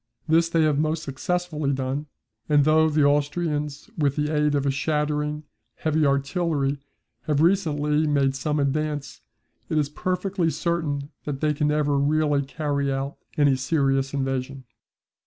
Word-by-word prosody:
This 165 +1 +3
they 165 -1 +2
have 150 -2 +2
most 155 +1 0
successfully 155 +1 -2
done, 135 +3 -3 0.4
and 145 -2 +4
though 160 +1 +4
the 150 -1 +2
Austrians 145 0 0
with 145 -3 +1
the 150 +1 -1
aid 150 0 +2
of 140 -1 0
a 140 - +2
shattering 150 +1 -1 0.3
heavy 155 -1 +1
artillery 140 0 0 0.5
have 150 -2 +1
recently 155 -4 +2
made 140 -2 +2
some 150 +2 -1
advance, 145 +1 -2 0.5
it 155 - 0
is 145 -2 +1
perfectly 180 +2 -1
certain 155 -4 -2
that 145 -2 -3
they 150 0 +1
can 150 0 0
never 150 -1 +1
really 145 0 +2
carry 140 0 -2
out 135 +1 -3 0.2
any 145 -2 +4
serious 135 0 +1
invasion. 135 -1 -3
150 Hz, 145 wpm, -24 LUFS, 140-155 Hz, 0.5 s, and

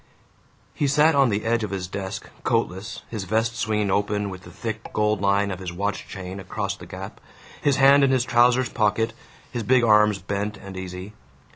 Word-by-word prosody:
He 145 - 0
sat 150 +3 +4
on 140 -3 +4
the 105 0 -1
edge 115 0 +1
of 105 - -2
his 95 -2 -4
desk, 95 +1 -5 0.2
coatless, 95 +6 -1
his 105 -5 -4
vest 115 +4 0
swinging 105 -3 0
open 105 0 0
with 95 -1 -8
the - - -11
thick 110 +4 -6
gold 105 -2 +1
line 100 0 +2
of 95 - -5
his 90 -2 -5
watch 100 +3 -3
chain 95 0 -7
across 100 +1 -3
the - - -12
gap, 95 +1 -8 0.4
his 140 -2 +3
hands 140 +1 +6
in 135 - +4
his 130 -2 +2
trousers 120 +1 +4
pockets, 110 +1 +1 0.4
his 120 - -3
big 120 +3 +3
arms 105 -2 +5
bent 100 +2 -3
and 100 0 -10
easy. 95 +2 -7
105 Hz, 190 wpm, -24 LUFS, 95-115 Hz, 0.4 s, hands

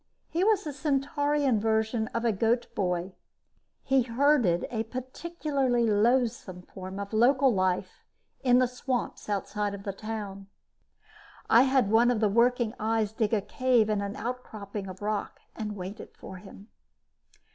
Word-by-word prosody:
He 340 +3 +1
was 415 -1 +3
the 300 - -5
Centaurian 285 -2 +1
version 220 +1 0
of 230 +1 -3
a 230 - +4
goat 225 +4 +1
boy 180 -1 -1 0.7
he 270 0 +3
herded 240 - +2
a 225 -2 -2
particularly 260 0 -1
loathsome 220 -4 +1
form 190 +1 -8
of 200 +1 -6
local 255 +3 +4
life 185 -2 -1 0.4
in 250 -2 +4
the 255 0 +4
swamps 250 -2 -4
outside 205 0 -2
the 200 - -4
town. 200 -2 -6 1.0
I 235 - +8
had 260 -5 +2
one 235 +2 +5
of 245 -3 +1
the 215 -1 +2
working 235 +1 +2
eyes 220 -1 0
dig 220 -2 0
a 220 -3 +2
cave 230 +1 +2
in 210 -1 0
an 200 0 -4
outcropping 215 -4 -6
of 185 +1 -9
rock 210 0 -3 0.2
and 210 -2 -4
wait 195 +3 -7 0.2
for 190 - -9
him. 195 +3 -13
225 Hz, 145 wpm, -28 LUFS, 205-255 Hz, 1.0 s, I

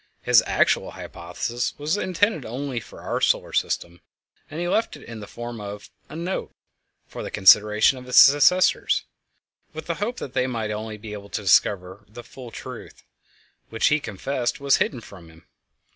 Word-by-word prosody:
His 120 -2 +5
actual - - +2
hypothesis 100 +8 -5
was 150 +4 -1
intended 205 - 0
only 130 +2 -4
for - - -13
our - - -3
solar - - +1
system, 85 0 -2 0.5
and 155 - -7
he 175 - -2
left 220 +5 0
it - - -15
in 115 -2 -9
the 105 - -9
form 120 -1 -7
of 100 0 -8 0.2
a 150 - -9
"note" 175 +3 -4 0.5
for - - -9
the - - -5
consideration 105 +5 +5
of 125 - -12
his 125 - -4
successors, 145 +6 +5 0.7
with 160 0 -7
the 170 - -2
hope 235 +4 -2
that 135 - -7
they 125 - +1
might 115 -4 -3 0.3
be 105 -1 -7
able 100 -1 -9
to 105 - -4
discover 95 +1 +2
the 120 +3 -11
full 125 -1 -11
truth, - - -10 0.7
which 110 - +2
he 150 0 +2
confessed 125 +2 -3
was 140 -1 +3
hidden 125 - -1
from 90 -6 -14
him. 80 0 -19
120 Hz, 175 wpm, -24 LUFS, 105-145 Hz, 0.7 s, His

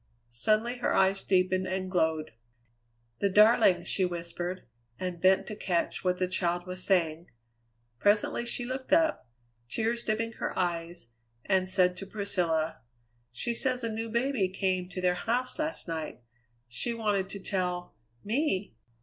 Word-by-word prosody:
Suddenly 215 - +1
her - - +1
eyes 195 0 +3
deepened 185 0 +2
and 185 0 -3
glowed. 160 -5 +1 0.9
"The 200 - +2
darling!" 210 -3 +5
she 190 - 0
whispered, 175 +1 -3 0.4
and 180 -2 -4
bent 190 +1 +4
to 215 - -6
catch 175 -4 -1
what 180 -1 +1
the 185 - 0
child 175 -1 -1
was 185 0 -5
saying. 170 -3 +1 0.7
Presently 205 - +2
she 240 0 -2
looked 260 +1 -5
up, 315 - +3 0.4
tears 230 - 0
dimming 225 +1 -1
her - - -3
eyes, 170 -6 -2 0.4
and 190 -1 +2
said 180 -1 +3
to 195 - -7
Priscilla, 165 - -1 0.5
"She 180 - -2
says 255 0 0
a 225 -1 -1
new 225 +1 -3
baby 235 -4 +1
came 185 -1 -1
to 185 0 -5
their 180 -1 +3
house 245 - -1
last 310 -6 -2
night. 160 -6 -5 0.4
She 125 - -2
wanted 205 -4 0
to 200 - -5
tell 180 -2 -2 0.3
me!" 210 - 0
185 Hz, 150 wpm, -29 LUFS, 175-220 Hz, 0.9 s, darling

